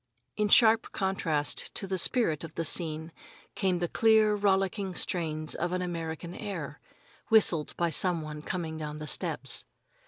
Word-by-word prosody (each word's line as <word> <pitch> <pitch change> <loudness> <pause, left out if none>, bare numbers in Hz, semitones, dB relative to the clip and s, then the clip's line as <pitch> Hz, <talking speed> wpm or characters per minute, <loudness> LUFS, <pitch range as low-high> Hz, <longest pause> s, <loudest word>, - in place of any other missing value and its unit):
In 210 -1 0
sharp 225 +1 +5
contrast 165 -7 -1
to - - -2
the 190 -1 -1
spirit 170 - +1
of 160 -1 -9
the 165 - -2
scene 160 -1 0 0.4
came 185 -2 0
the 175 0 -1
clear, 220 +1 +4
rollicking 195 -1 0
strains 155 -3 +1
of 175 +2 -2
an 185 0 -1
American 170 -1 -5
air, 175 -10 -6 0.5
whistled 185 -9 +3
by 170 -1 0
some 170 +1 0
one 150 0 -7
coming 165 -1 -4
down 150 -1 -5
the 155 - -7
steps. - - -1
175 Hz, 155 wpm, -29 LUFS, 160-195 Hz, 0.5 s, sharp